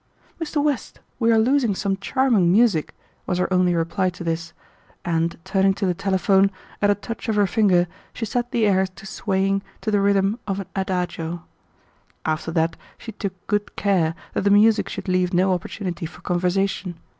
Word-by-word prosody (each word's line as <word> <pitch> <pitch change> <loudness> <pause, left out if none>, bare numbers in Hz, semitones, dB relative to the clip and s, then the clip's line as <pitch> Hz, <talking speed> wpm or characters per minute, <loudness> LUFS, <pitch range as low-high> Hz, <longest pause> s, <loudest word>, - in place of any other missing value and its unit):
"Mr. 300 -2 -1
West, 290 -5 -2 0.2
we 230 -1 +3
are 225 - +5
losing 240 -2 +3
some 195 0 0
charming 200 -3 +2
music," 200 -6 +3 0.3
was 180 - 0
her 180 - +1
only 180 -1 +3
reply 165 +3 0
to 175 -1 -8
this, 165 0 -3 0.5
and 165 0 0
turning 195 0 +2
to 200 - -2
the 180 - +2
telephone, 195 +1 +2 0.3
at 205 - +4
a 205 - +4
touch 225 +2 -6
of 220 - +1
her 205 -1 +4
finger 190 -4 +3 0.2
she 225 - -4
set 240 +2 -2
the 230 -2 +2
air 190 -2 +3
to 185 +1 -15
swaying 195 0 0 0.2
to 215 - -2
the 205 -1 +3
rhythm 200 +2 +2
of 195 -1 -1
an 195 - -4
adagio. 175 -3 -2 0.8
After 155 +1 -1
that 165 -1 +1 0.2
she 225 - -8
took 195 -4 -6
good 205 -1 -1
care 175 -5 +1 0.2
that - - 0
the 200 - +2
music 210 +2 +4
should - - -6
leave 180 -1 +1
no 185 +1 +3
opportunity 180 -1 -4
for 160 - -15
conversation. 180 0 -1
195 Hz, 180 wpm, -23 LUFS, 180-205 Hz, 0.8 s, are